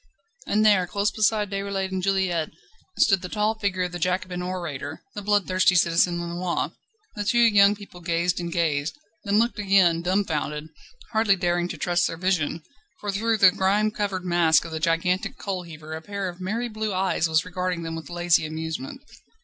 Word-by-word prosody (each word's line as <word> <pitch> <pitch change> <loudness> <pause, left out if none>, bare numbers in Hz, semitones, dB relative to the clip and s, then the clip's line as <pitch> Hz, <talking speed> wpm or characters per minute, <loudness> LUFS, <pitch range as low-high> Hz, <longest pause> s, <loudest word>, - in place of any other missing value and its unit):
And 215 +1 +2
there, 195 -4 +4
close 200 +3 0
beside 210 -1 +1
Déroulède 195 -1 -2
and 190 0 -2
Juliette, 185 -4 0 0.5
stood 195 -4 +4
the 180 - -6
tall 210 +1 +1
figure 190 -3 0
of 180 - -3
the 175 - -6
Jacobin 180 +1 -1
orator, 170 -5 -5
the 205 - -5
bloodthirsty 190 -3 +2
Citizen 175 0 +3
Lenoir. 170 +1 -2 0.4
The 205 - -2
two 205 +4 +1
young 205 -3 +6
people 200 -3 -13
gazed 170 +1 0
and 170 -1 -4
gazed, 160 - -1 0.3
then 205 +1 +2
looked 235 0 +1
again, 190 -4 +4
dumfounded, 160 -5 -1 0.4
hardly 220 -3 +3
daring 175 -1 0
to - - -6
trust 175 0 +1
their 165 - -5
vision, 170 -3 -1 0.4
for 205 - -3
through 220 +3 0
the 195 -3 +7
grime 205 +3 +1
covered 200 -3 -3
mask 170 -2 +3
of 165 - -7
the 160 - -3
gigantic 165 +3 0
coal 190 -2 -3
heaver 160 -2 -10
a 160 - -5
pair 200 +2 -4
of 180 0 -8
merry 225 +6 -2
blue 215 -3 -3
eyes 185 -3 +1
was 160 -1 +2
regarding 180 -1 -3
them 165 0 -4
with 165 - -8
lazy 175 -1 +2
amusement. 160 - -5
185 Hz, 180 wpm, -25 LUFS, 170-200 Hz, 0.5 s, the